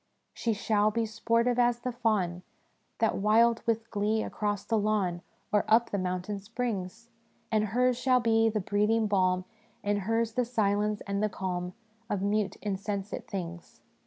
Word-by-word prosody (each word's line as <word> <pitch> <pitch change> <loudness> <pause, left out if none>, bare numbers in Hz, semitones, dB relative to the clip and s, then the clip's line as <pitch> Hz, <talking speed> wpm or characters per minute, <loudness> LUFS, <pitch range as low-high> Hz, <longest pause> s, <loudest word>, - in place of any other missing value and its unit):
" - - -47
' - - -49
She 230 - -1
shall 210 0 +2
be 230 +1 0
sportive 230 +2 +1
as 240 -1 +3
the 250 - -2
fawn, 210 -7 0 0.6
That 225 - +1
wild 225 +3 +4
with 225 0 0
glee 215 +1 +1
across 205 -1 -2
the 225 -1 +1
lawn 200 -5 0 0.3
Or 210 0 +3
up 230 +2 +4
the 200 - 0
mountain 185 +2 -2
springs; 225 0 -4 0.4
And 215 -1 +2
hers 245 +3 +1
shall 255 0 +3
be 225 -1 +3
the 215 -1 -1
breathing 210 +3 +2
balm, 185 -3 +2 0.4
And 205 0 +1
hers 225 +3 0
the 250 - +1
silence 210 -3 0
and 200 0 -2
the 215 - +2
calm 180 -2 -4 0.3
Of 195 -2 -1
mute, 205 0 0
insensate 200 0 -3
things. 175 -3 -6
210 Hz, 165 wpm, -29 LUFS, 200-230 Hz, 0.6 s, wild